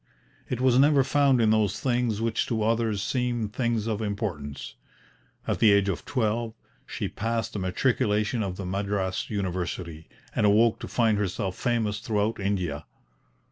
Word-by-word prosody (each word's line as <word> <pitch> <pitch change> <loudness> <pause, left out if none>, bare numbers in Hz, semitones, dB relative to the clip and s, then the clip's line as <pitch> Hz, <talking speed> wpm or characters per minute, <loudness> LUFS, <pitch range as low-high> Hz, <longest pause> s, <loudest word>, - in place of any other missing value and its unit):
It 125 - -2
was 130 -1 +4
never 140 0 +5
found 140 -2 +3
in 110 -2 +4
those 105 -1 +1
things 120 -3 0
which 115 -1 0
to 110 -2 -1
others 110 -2 +1
seemed 120 -4 -1
things 115 -3 0
of 110 -1 -2
importance. 95 - -4 0.7
At - - -1
the 110 - +6
age 100 -1 +3
of 85 -6 -3
twelve 115 -2 -1 0.3
she - - -3
passed 115 0 -2
the 105 - -3
Matriculation 105 +3 +1
of 95 -3 -3
the 95 - -5
Madras 95 0 -2
University, 90 -5 -4 0.3
and - - +1
awoke 110 +2 +4
to - - -6
find 110 -4 +2
herself 95 -1 -2
famous 110 -4 0
throughout 110 -2 -1
India. 90 -7 -2
110 Hz, 155 wpm, -26 LUFS, 100-115 Hz, 0.7 s, the